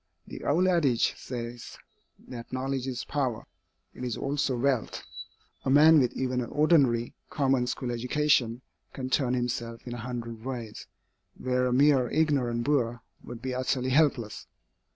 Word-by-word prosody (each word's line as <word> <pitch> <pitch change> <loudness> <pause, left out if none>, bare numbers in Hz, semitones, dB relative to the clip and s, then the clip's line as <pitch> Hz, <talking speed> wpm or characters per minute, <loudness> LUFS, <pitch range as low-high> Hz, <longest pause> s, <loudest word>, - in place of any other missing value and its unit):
The - - -9
old 175 +6 +2
adage 150 -10 +2
says 120 -1 -7 0.5
that 120 -2 -9
knowledge 130 0 -2
is 125 0 -4
power. 130 -6 -2 0.5
It - - -9
is 120 -3 -2
also 140 -2 -1
wealth. 130 -2 0 0.6
A - - -1
man 155 +3 +7
with 125 -3 +2
even 125 -1 -1
an 120 - -5
ordinary, 140 -7 +3 0.2
common 135 -3 +1
school 125 0 -3
education, 125 -1 +1 0.3
can 130 -1 -5
turn 130 -3 +2
himself 120 -1 -3
in 120 - -5
a - - -5
hundred 115 -1 -6
ways, 120 -4 -6 0.5
where 125 0 0
a - - 0
mere 135 -1 +4
ignorant 135 -7 +1
boor 120 -4 0 0.2
would 120 -1 -9
be 130 -1 -2
utterly 130 0 -1
helpless. 130 -7 +1
125 Hz, 150 wpm, -28 LUFS, 120-140 Hz, 0.6 s, man